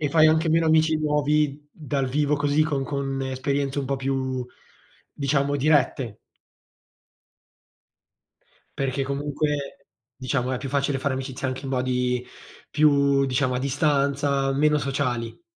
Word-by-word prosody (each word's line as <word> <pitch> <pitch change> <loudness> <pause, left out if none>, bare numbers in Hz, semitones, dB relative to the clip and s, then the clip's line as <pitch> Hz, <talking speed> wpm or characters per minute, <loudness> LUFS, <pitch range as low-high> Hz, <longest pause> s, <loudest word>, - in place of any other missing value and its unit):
E 150 - 0
fai 155 +2 +5
anche 160 +1 +2
meno 165 +1 +3
amici 160 0 +4
nuovi 150 -1 0
dal 140 -3 -2
vivo 150 +2 +1
così 145 +1 +2
con 140 -3 -1
con 135 -1 -3
esperienze 135 +1 -2
un 135 - -3
po' 135 +1 -1
più, 130 -1 -2 0.7
diciamo, 140 0 0
dirette. 135 -6 +1 2.6
Perché, 135 0 -1
comunque, 140 0 -3 0.3
diciamo, 130 0 -2
è 125 - -1
più 135 - -6
facile 140 0 0
fare 140 0 -1
amicizia 130 0 -4
anche 130 +2 -4
in 135 - -5
modi 125 -1 0 0.4
più 140 -2 +3
diciamo, 130 0 0
a - - -1
distanza, 140 0 +1
meno 150 +2 +3
sociali. 130 - -2
140 Hz, 130 wpm, -24 LUFS, 130-150 Hz, 2.6 s, fai